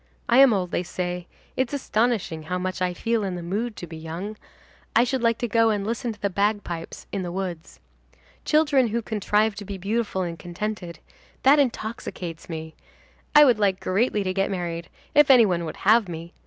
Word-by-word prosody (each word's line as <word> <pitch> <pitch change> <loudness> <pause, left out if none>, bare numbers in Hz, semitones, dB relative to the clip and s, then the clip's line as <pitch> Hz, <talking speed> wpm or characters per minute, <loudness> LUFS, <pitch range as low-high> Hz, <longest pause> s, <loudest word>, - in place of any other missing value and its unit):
I 240 +2 +5
am 270 -2 +8
old, 185 -4 0
they - - 0
say; 180 0 -4 0.3
it's 260 +1 -1
astonishing 225 - 0
how 180 - 0
much 185 0 -3
I 180 -1 +1
feel 225 +5 -1
in 190 -2 -2
the 175 - -6
mood 210 +6 -2
to - - -7
be 165 -1 -10
young. 165 +7 -6 0.6
I 235 - +6
should 255 +1 -1
like 230 -1 +2
to 240 - -2
go 230 0 +3
and 205 -2 0
listen 235 +2 -2
to 215 - -11
the 200 - 0
bagpipes 200 -4 -2
in 195 - -2
the 175 -1 -4
woods. 180 -3 -5 0.6
Children 290 -5 +3
who 230 +1 -2
contrive 215 0 +1
to 205 0 -8
be 200 0 -6
beautiful 200 0 -1
and 170 -2 -5
contented,—that 205 - -1
intoxicates 220 - -3
me. 160 -1 -6 0.6
I 295 0 +10
would 245 -6 +4
like 195 -2 +2
greatly 210 +2 +1
to 185 -1 -1
get 195 +1 0
married, 170 -3 -4 0.2
if 295 -1 +6
any 250 -4 +8
one 175 -4 0
would 155 - -6
have 220 -3 +4
me. 170 +1 -7
200 Hz, 195 wpm, -24 LUFS, 175-230 Hz, 0.6 s, I